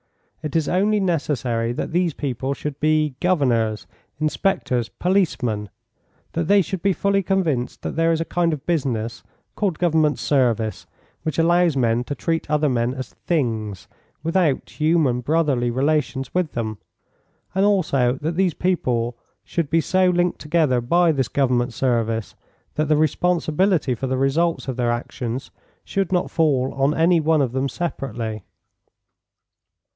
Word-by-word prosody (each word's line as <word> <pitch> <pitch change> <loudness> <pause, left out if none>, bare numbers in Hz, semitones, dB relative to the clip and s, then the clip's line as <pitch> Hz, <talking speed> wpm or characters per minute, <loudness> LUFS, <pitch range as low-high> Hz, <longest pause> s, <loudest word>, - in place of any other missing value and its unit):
It 155 -1 -5
is 160 -2 +2
only 205 +4 +2
necessary 130 - 0
that - - -4
these 175 -2 +1
people 135 0 -2
should 150 +1 -4
he 155 -1 +2
governors, 120 -11 +1 0.3
inspectors, 150 - 0
policemen; 125 - 0 0.6
that 165 -1 -2
they 200 0 +5
should 180 +2 -4
be 195 +1 +2
fully 200 +2 +1
convinced 170 -10 -1
that - - -4
there 165 +1 +3
is 165 - +1
a 165 - -1
kind 175 -1 +1
of 150 -4 -5
business, 125 -9 -1 0.3
called 195 -7 -1
government 160 -4 +2
service, 115 -6 0 0.3
which 155 -3 -3
allows 170 -2 +3
men 120 -1 +2
to 145 - -4
treat 165 -1 -2
other 150 0 +2
men 120 0 0
as 130 -1 -7
things, 110 - -2 0.4
without 165 -4 +1
human 155 -6 +2
brotherly 140 -4 +1
relations 135 +1 0
with 180 -4 0
them, 110 -3 -3 0.7
and 190 +1 +2
also 155 -12 +2
that 160 +2 -1
these 185 -2 +1
people 125 -10 0 0.3
should 165 -5 -2
be 165 +1 +3
so 185 +2 +2
linked 175 0 +1
together 150 -5 +1
by 170 +7 +3
this 135 -5 0
government 125 -2 +1
service 115 -4 0 0.4
that 155 - 0
the 155 0 +3
responsibility 165 0 +1
for 130 +3 -3
the 130 0 -1
results 150 +5 +1
of 130 - -2
their 120 -1 +1
actions 120 +1 -4 0.3
should 195 -3 -2
not 180 -1 0
fall 140 -6 +1
on 135 +2 +1
any 170 +1 +4
one 155 -1 +3
of 125 - -1
them 130 +2 -1
separately. 120 - -4
150 Hz, 150 wpm, -22 LUFS, 125-170 Hz, 0.7 s, they